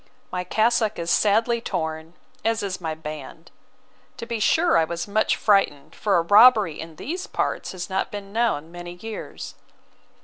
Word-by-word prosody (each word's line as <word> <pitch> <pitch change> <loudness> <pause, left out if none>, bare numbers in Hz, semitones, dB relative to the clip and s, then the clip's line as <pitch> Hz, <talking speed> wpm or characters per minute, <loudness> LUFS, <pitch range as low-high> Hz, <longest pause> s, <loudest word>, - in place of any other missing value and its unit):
My 180 0 -2
cassock 220 +3 +1
is 170 0 -2
sadly 225 +3 +2
torn, 160 -3 -4 0.3
as 225 -2 0
is 185 -2 -4
my 160 -2 -3
band. 155 +1 -9 0.7
To - - -6
be 230 -1 -3
sure, 330 +10 +3
I - - +5
was 170 +2 -4
much 215 +2 +1
frightened, 155 -8 +1
for 200 -4 +1
a 170 - +2
robbery 205 -2 +6
in 160 0 -8
these 355 - -5
parts - - -2
has 180 -1 -5
not 190 0 -1
been 200 -1 -8
known 215 -9 0
many 175 0 -8
years. 220 +5 -8
195 Hz, 165 wpm, -24 LUFS, 165-220 Hz, 0.7 s, robbery